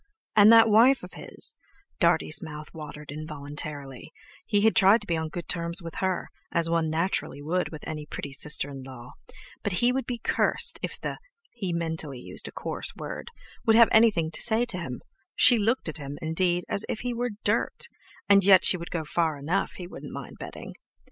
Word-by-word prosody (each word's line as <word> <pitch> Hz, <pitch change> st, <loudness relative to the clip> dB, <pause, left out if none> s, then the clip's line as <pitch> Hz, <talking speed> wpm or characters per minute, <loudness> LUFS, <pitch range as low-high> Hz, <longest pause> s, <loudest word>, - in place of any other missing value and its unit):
And 210 Hz, +1 st, +8 dB
that 225 Hz, 0 st, +8 dB
wife 235 Hz, +5 st, +5 dB
of -, -, -10 dB
his -, -, -1 dB, 0.4 s
(Dartie's -, -, +2 dB
mouth 150 Hz, -3 st, -9 dB
watered 150 Hz, -2 st, -9 dB
involuntarily), 145 Hz, -2 st, -6 dB, 0.4 s
he 205 Hz, -, +2 dB
had 220 Hz, +1 st, +3 dB
tried 200 Hz, +4 st, +6 dB
to -, -, -4 dB
be 170 Hz, -, -1 dB
on 160 Hz, -1 st, -3 dB
good 170 Hz, +1 st, -7 dB
terms 170 Hz, +1 st, 0 dB
with 165 Hz, -1 st, -7 dB
her, 190 Hz, -2 st, -2 dB, 0.2 s
as 170 Hz, -1 st, +3 dB
one 165 Hz, -1 st, +1 dB
naturally 160 Hz, -3 st, -2 dB
would 170 Hz, +5 st, -1 dB
with 155 Hz, -, -9 dB
any 150 Hz, -1 st, -6 dB
pretty 140 Hz, -, -6 dB
sister 145 Hz, 0 st, 0 dB
in 135 Hz, -1 st, -8 dB
law, 125 Hz, -2 st, -11 dB, 0.5 s
but 205 Hz, -, -2 dB
he 240 Hz, +7 st, +3 dB
would 265 Hz, +1 st, -2 dB
be 245 Hz, -, -3 dB
cursed 230 Hz, -, +1 dB
if -, -, -5 dB
the -, -, -5 dB, 0.3 s
(he 195 Hz, -7 st, -4 dB
mentally 160 Hz, -4 st, -3 dB
used -, -, -5 dB
a -, -, -8 dB
coarse -, -, -3 dB
word)—would 230 Hz, -, -4 dB
have 230 Hz, 0 st, +7 dB
anything 210 Hz, -8 st, +4 dB
to -, -, -2 dB
say 235 Hz, +1 st, +3 dB
to 200 Hz, -7 st, -4 dB
him—she 220 Hz, -, +2 dB
looked 225 Hz, +2 st, 0 dB
at 155 Hz, -, -3 dB
him, 145 Hz, -1 st, -7 dB
indeed, 175 Hz, +2 st, 0 dB
as 200 Hz, -, -1 dB
if 215 Hz, -, -3 dB
he 245 Hz, 0 st, -3 dB
were 240 Hz, -1 st, -3 dB
dirt—and 200 Hz, -1 st, 0 dB
yet 190 Hz, -1 st, +7 dB
she 180 Hz, -, +6 dB
could 170 Hz, -, -7 dB
go 165 Hz, -2 st, -3 dB
far 160 Hz, 0 st, -1 dB
enough, 165 Hz, +8 st, -2 dB
he 180 Hz, -, -8 dB
wouldn't 175 Hz, -, -10 dB
mind -, -, -8 dB
betting. -, -, -9 dB
170 Hz, 190 wpm, -26 LUFS, 150-210 Hz, 0.5 s, And